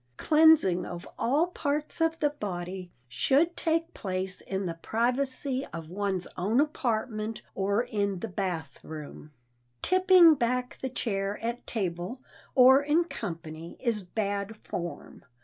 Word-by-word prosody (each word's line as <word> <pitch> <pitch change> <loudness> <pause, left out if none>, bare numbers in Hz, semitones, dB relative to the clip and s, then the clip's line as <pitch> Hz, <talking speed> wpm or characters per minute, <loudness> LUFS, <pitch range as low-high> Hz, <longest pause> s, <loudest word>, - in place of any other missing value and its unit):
Cleansing 305 - +5
of 175 -1 -7
all 285 +8 +3
parts 300 -3 -2
of 325 0 +2
the 295 -3 +2
body 185 -7 -5 0.2
should 275 - +2
take 330 +1 0
place 185 -1 -3
in 195 0 -3
the 170 - -2
privacy 255 - -1
of 165 -1 -7
one's 195 -1 -1
own 210 +8 +1
apartment 225 -6 -1
or 200 +4 +1
in 205 -5 -1
the 200 - -4
bath 185 -5 -4
room. 155 -1 -9 0.5
Tipping 370 -2 +7
back 250 -1 -1
the 265 - -2
chair 200 -5 -2
at 235 +1 -4
table 185 +2 -3 0.4
or 265 +2 +8
in 300 +4 +3
company 165 - -7
is 230 -4 0
bad 200 +2 -3
form. 175 -4 -7
220 Hz, 130 wpm, -28 LUFS, 185-280 Hz, 0.5 s, or